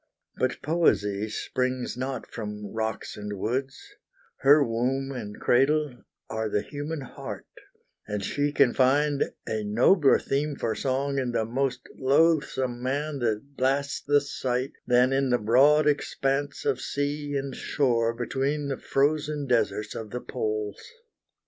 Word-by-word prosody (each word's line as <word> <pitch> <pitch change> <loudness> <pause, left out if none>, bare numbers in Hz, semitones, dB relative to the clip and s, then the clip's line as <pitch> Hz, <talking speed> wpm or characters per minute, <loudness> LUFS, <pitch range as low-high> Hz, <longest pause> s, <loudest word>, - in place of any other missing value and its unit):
But 130 0 -1
Poesy 105 - +1
springs 130 +3 -2
not 130 +1 -4
from 105 -2 -7
rocks 110 -1 -3
and 105 -1 -6
woods; 130 +7 -2 0.6
Her 145 +2 +6
womb 130 +3 -1
and 105 -6 -6
cradle 135 -2 +2 0.2
are 110 0 -2
the 105 - 0
human 145 +1 -5
heart, 130 - -8 0.6
And 105 -1 -3
she 145 +6 0
can 140 -4 +4
find 140 +2 +3 0.2
a 110 -1 -2
nobler 130 - +4
theme 145 +1 -1
for 115 -4 -1
song 140 +1 -1
In 125 -2 -2
the 110 - +1
most 130 +3 -1 0.2
loathsome 135 -3 +2
man 140 +3 -2
that 120 +4 -2
blasts 140 +2 0
the 145 0 +3
sight, 130 -1 -2 0.2
Than 125 +1 +4
in 135 0 +1
the 125 - +3
broad 135 +8 +5
expanse 145 -1 0
of 140 -3 +1
sea 145 0 -2
and 135 -1 -3
shore 120 -5 +1
Between 135 +5 -1
the 135 - -2
frozen 145 +1 0
deserts 115 -4 0
of 110 -1 -6
the 125 - -4
poles. 110 -3 -3
130 Hz, 140 wpm, -27 LUFS, 115-145 Hz, 0.6 s, Her